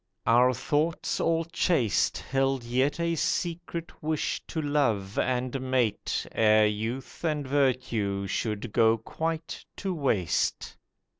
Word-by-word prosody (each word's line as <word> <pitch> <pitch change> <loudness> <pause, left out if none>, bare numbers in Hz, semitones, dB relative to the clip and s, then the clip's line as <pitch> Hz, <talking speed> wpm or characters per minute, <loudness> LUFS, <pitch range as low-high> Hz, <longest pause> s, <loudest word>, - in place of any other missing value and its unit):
Our 125 +2 +5
thoughts 150 +6 -1
all 165 0 +1
chaste 165 - +1
Held 135 -1 0
yet 130 +6 0
a 170 0 +1
secret 170 +1 -3
wish 155 -1 -1
to 160 - -4
love 125 -10 0
and 130 +1 -1
mate 125 -5 0
Ere 110 -1 +4
youth 115 +7 -3
and 150 -4 -1
virtue 125 -8 0
should 105 +3 -3
go 115 0 +4
quite 160 +8 -4
to 195 -2 -2
waste. 120 - 0
130 Hz, 120 wpm, -28 LUFS, 110-155 Hz, -, Our